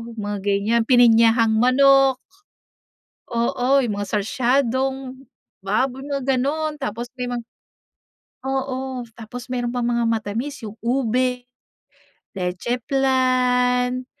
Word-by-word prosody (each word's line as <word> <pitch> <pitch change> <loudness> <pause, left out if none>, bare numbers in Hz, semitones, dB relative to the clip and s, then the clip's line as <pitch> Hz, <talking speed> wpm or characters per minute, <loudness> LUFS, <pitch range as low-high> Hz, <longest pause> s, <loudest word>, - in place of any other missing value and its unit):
mga 205 -1 -4
ganyan, 205 +4 +1
pininyahang 230 -2 +5
manok. 270 +1 +4 1.1
Oo, 250 +3 +1
yung 215 - -2
mga 205 - -4
sarsyadong 260 +4 -1 0.4
baboy, 245 +7 -1
mga 280 -2 -3
gano’n. 300 +3 -2
Tapos 235 +4 -5
may 250 0 -3
mga 240 -1 -4 1.0
oo, 265 -1 -3 0.2
tapos 240 +3 -9
meron 245 -1 -2
pang 245 -1 -1
mga 235 0 +1
matamis 230 +5 -3
yung 215 0 -8
ube, 250 +1 0 1.0
leche 185 +7 -2
flan, 255 -1 +1
250 Hz, 100 wpm, -22 LUFS, 230-265 Hz, 1.1 s, pininyahang